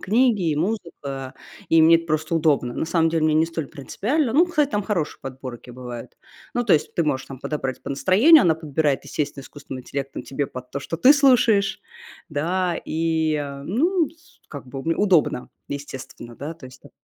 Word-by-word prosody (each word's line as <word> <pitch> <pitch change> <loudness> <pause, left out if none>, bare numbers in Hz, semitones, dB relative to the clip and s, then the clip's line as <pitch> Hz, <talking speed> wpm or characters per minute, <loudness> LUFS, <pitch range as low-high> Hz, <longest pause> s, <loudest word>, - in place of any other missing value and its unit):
книги, 215 -4 +2
и 150 - -1
музыка, 150 -8 -4 0.3
и 165 -1 +5
мне 165 +1 +7
это 165 0 -6
просто 155 +1 -1
удобно. 145 -6 +2
На - - -2
самом 165 -1 +2
деле 165 -1 +1
мне 155 -1 +3
не 155 +1 +4
столь 165 -3 -4
принципиально. 230 - -2
Ну, 325 +7 +5
кстати, 305 -5 +1
там 205 - 0
хорошие 190 -7 -2
подборки 130 -2 -8
бывают. 125 -1 -8 0.4
Ну, 245 - 0
то 210 - +3
есть 150 - +1
ты 170 - +1
можешь 135 -3 -1
там 135 - -9
подобрать 135 -2 -4
по - - -6
настроению, 220 - +6
она 165 -2 +4
подбирает, 150 -3 -1
естественно, 145 -2 -3
искусственным 135 -1 -9
интеллектом 135 +1 -5
тебе 140 +1 -3
под 125 -1 -9
то, 140 - -4
что 165 - -4
ты 255 - +7
слушаешь. 245 -8 +3 0.5
Да, 170 +4 0
и, 160 -1 0
э, 140 -2 -4
ну, 315 - +1
с 330 +1 -25
как 145 -3 -9
бы, 135 - -7
уб 135 - -8
удобно, 175 -10 +2 0.2
естественно, 135 -4 -8
да, 150 +4 -6
то 165 - -15
есть 130 - -15
там. - - -16
160 Hz, 195 wpm, -23 LUFS, 140-195 Hz, 0.5 s, мне